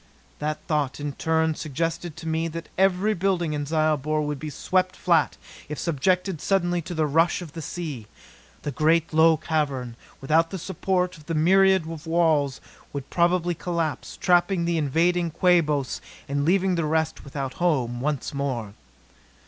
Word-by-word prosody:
That 150 +1 -1
thought, 150 -4 0
in 145 -1 -3
turn, 160 +2 +1
suggested 165 +2 -3
to 165 - -7
me 160 +1 0
that 165 +1 -7
every 195 +2 +3
building 180 -4 0
in 145 -1 -3
Zyobor 155 -1 +1
would 150 -1 -3
be 155 - -5
swept 185 +4 0
flat 170 -4 +2 0.3
if 150 - -4
subjected 180 +2 0
suddenly 175 -1 +1
to 175 +2 -7
the 155 -1 +2
rush 165 +6 +2
of 155 -4 -11
the 165 - -6
sea. 150 -10 -5 0.6
The 145 - -2
great 160 +4 +2
low 160 0 +5
cavern, 140 -7 -2 0.2
without 160 +4 +2
the 190 - -5
support 180 0 -1
of 150 - -17
the 165 - -2
myriad 190 +2 +4
walls, 160 -4 +1 0.3
would 140 -2 -6
probably 175 0 +2
collapse 165 -2 -3
trapping 175 0 +2
the 170 -1 +1
invading 170 +4 +1
Quabos 155 -5 +2 0.3
and 140 +1 -1
leaving 190 +2 +3
the 165 -2 0
rest 160 +1 0
without 135 -2 -5
a - - -19
home 130 -9 0
once 145 -1 -2
more. 130 -7 -3
160 Hz, 160 wpm, -25 LUFS, 150-175 Hz, 0.6 s, low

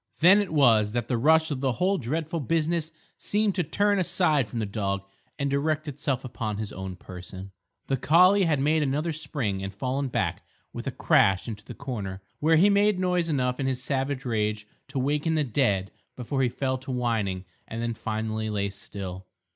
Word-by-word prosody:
Then 190 +5 +7
it 200 - -4
was 115 -8 +4
that 120 -2 -1
the 125 - 0
rush 160 +4 +4
of 140 - -2
the 130 -2 +1
whole 190 +5 +1
dreadful 160 +6 -2
business 160 +3 0 0.3
seemed 210 0 +1
to 180 - 0
turn 205 +6 +1
aside 170 - +2
from 120 - -6
the 110 - 0
dog 100 -2 -2 0.3
and 140 -1 -1
direct 150 +2 0
itself 135 -2 -2
upon 110 -4 -4
his 105 -1 -5
own 95 0 -6
person. 90 +1 -10 0.3
The 135 - 0
collie 180 +8 +5
had 155 -4 +2
made 155 +3 +2
another 150 +4 0
spring 130 -10 -3
and 95 0 -4
fallen 130 +7 -2
back 125 - -1 0.3
with - - -6
a - - 0
crash 95 +2 +3
into 105 -3 -6
the - - -9
corner, 100 -9 -5 0.2
where 160 +2 +4
he 175 +6 +6
made 205 0 +4
noise 180 -2 +1
enough 125 -3 0
in 135 - 0
his 130 -1 -2
savage 135 0 -2
rage 105 -2 -1 0.2
to 135 +1 -6
waken 150 +4 +1
the 155 - +2
dead 105 -7 +1 0.2
before 135 +2 -2
he 125 - +3
fell 130 +1 -2
to 130 +2 -11
whining 110 -7 -1 0.2
and 115 - -5
then 115 0 -1
finally 110 0 -3
lay 100 -1 -1
still. 95 -2 -7
130 Hz, 195 wpm, -26 LUFS, 110-155 Hz, 0.3 s, Then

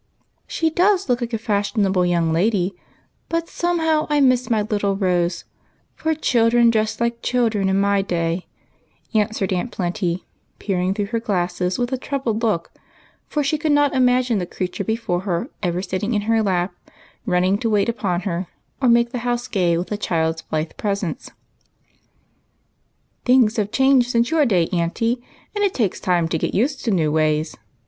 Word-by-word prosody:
" - - -48
She 325 -1 0
does 375 +2 +2
look 245 -1 +1
like 240 0 -3
a 225 - 0
fashionable 200 -4 +1
young 170 -2 +1
lady, 190 +1 +1 0.5
but 335 0 -1
somehow 320 -3 0
I 295 -1 +2
miss 255 -2 +3
my 220 -3 +2
little 205 -2 0
Rose, 180 -3 0 0.5
for 320 0 -1
children 235 -4 +3
dressed 220 -1 0
like 235 0 -1
children 225 -6 +1
in 190 +1 +2
my 200 0 +2
day," 170 -1 -2 0.7
answered 210 -3 0
Aunt 185 +7 -2
Plenty, 180 -1 -2 0.3
peer 195 -4 -2
ing 185 +2 0
through 205 +1 -3
her 230 - +2
glasses 180 -4 -1
with 245 +1 -1
a 260 - -1
troubled 250 -6 -2
look, 210 -8 0 0.6
for 295 - -1
she 295 +2 0
could 300 0 +1
not 290 -1 +3
imagine 250 -3 +2
the 180 - -3
creature 185 +2 -4
before 220 -5 -1
her 185 - -3
ever 180 -1 -1
sitting 195 +4 -2
in 205 - +1
her 225 +1 +2
lap, 185 -3 0 0.5
running 185 +1 +2
to 230 - -1
wait 205 -1 +2
upon 195 -7 -1
her, 180 -1 -3 0.3
or 255 - +4
making 235 0 +4
the 250 - -3
house 240 0 -2
gay 175 -4 +1
with 175 +3 -4
a 210 - -1
child's 160 -4 -1
blithe 155 0 -3
presence. 200 -4 -3 1.0
" - - -45
Things 245 -3 +4
have 205 -2 0
changed 265 -2 +4
since 235 +3 +1
your 310 -4 +3
day, 180 -7 +2
Aunt, 170 -1 -1
and 235 +2 0 0.4
it 405 -2 +1
takes 215 -7 0
time 175 -2 +1
to 160 - -1
get - - -2
used 265 +6 0
to - - +1
new 165 -7 +2
ways. 155 0 +1
210 Hz, 180 wpm, -21 LUFS, 180-245 Hz, 1.0 s, or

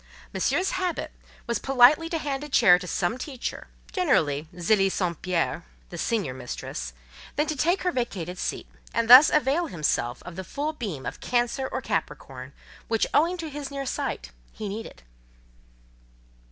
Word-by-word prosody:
Monsieur's 380 - +1
habit 365 -2 -2 0.3
was 235 -1 -1
politely 270 +5 +5
to 330 - -1
hand 285 -2 -3
a 295 - -7
chair 180 -9 +6
to 180 - -8
some 190 +8 -1
teacher, 260 -2 -5 0.2
generally 155 - +1
Zélie 195 +2 +2
St. 175 -5 -2
Pierre, 180 -3 -1 0.3
the - - -6
senior 205 - -1
mistress; 125 - -6 0.4
then 300 - +2
to 310 - -2
take 345 +7 +1
her 360 - +1
vacated 185 - -3
seat; - - -3 0.3
and 230 0 +1
thus 255 +5 +10
avail 300 +3 +2
himself 145 - -1
of 180 -1 -9
the 190 - -4
full 290 - -3
beam 200 - -5
of - - -5
Cancer 245 +2 0
or 260 - -2
Capricorn, 135 - -4 0.4
which, 225 -1 +1
owing 340 +4 +3
to 330 -2 -5
his 285 -1 -5
near 275 -1 -5
sight, 250 - -3 0.2
he 215 - -6
needed. 200 - -7
235 Hz, 160 wpm, -26 LUFS, 175-295 Hz, 0.4 s, thus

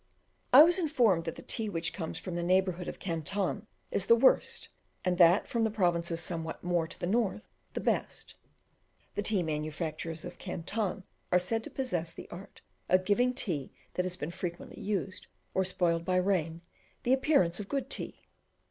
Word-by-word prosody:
I 275 +4 +11
was 350 +3 +4
informed 240 - +2
that 165 - -3
the - - -10
tea 225 -3 -2
which 165 -3 -2
comes 165 -3 -5
from 180 +1 -6
the 175 - -2
neighbourhood 185 0 +1
of - - -5
Canton 195 +4 -2 0.2
is 195 - 0
the 230 - +8
worst, 260 +3 +3 0.4
and 180 -1 +1
that 175 +3 +6
from 230 -1 0
the 220 - +2
provinces 175 -5 0
somewhat 165 -1 -4
more 175 -2 +1
to - - -11
the - - -2
north 215 +1 0 0.3
the - - -3
best. - - -2 0.8
The - - -1
tea 205 -3 +2
manufacturers 155 +1 -3
of 175 0 -9
Canton 195 +2 -3 0.3
are 180 - +6
said 220 +5 0
to - - -6
possess 175 -11 -2
the - - -10
art 185 +3 -10 0.3
of 185 0 +4
giving 245 +6 +3
tea 160 - -2 0.2
that 180 - 0
has 180 0 -3
been 150 - -4
frequently 175 -1 -6
used, 195 -2 -3 0.3
or 190 - +2
spoiled 175 -2 0
by 185 +1 0
rain, 180 -3 +1 0.4
the 250 - +3
appearance 265 - +3
of 200 - -6
good 275 -2 -1
tea. - - -3
180 Hz, 180 wpm, -31 LUFS, 170-210 Hz, 0.8 s, I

